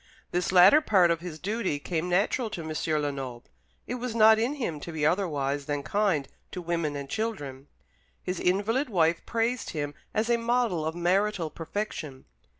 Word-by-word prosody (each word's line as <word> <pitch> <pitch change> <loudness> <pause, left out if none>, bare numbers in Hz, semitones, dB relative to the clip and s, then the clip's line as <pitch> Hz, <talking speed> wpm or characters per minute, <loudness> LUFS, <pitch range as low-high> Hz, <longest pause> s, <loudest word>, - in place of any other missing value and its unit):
This 180 0 0
latter 190 +11 +8
part 190 - +4
of 165 - 0
his 170 -2 -7
duty 200 -3 -2
came 165 +3 -3
natural 210 +6 +1
to 175 -5 -5
M. 155 - -3 0.3
Lenoble. 135 -4 -4 0.4
It - - -4
was 245 -2 -4
not 220 -1 +7
in 245 +6 0
him 175 - -3
to 170 - -7
be 155 -2 -1
otherwise 145 -6 0
than 145 -1 -2
kind 180 -5 +1 0.2
to 185 - -6
women 170 -4 -2
and 140 -1 -5
children. 145 -11 -4 0.6
His 180 -1 -3
invalid 220 +9 +1
wife 170 -4 +2
praised 230 +2 -1
him 145 -2 -3 0.2
as 220 +1 0
a 235 0 +3
model 230 -9 0
of 160 - -3
marital 180 -1 +1
perfection. 165 -6 -5
180 Hz, 170 wpm, -27 LUFS, 155-220 Hz, 0.6 s, latter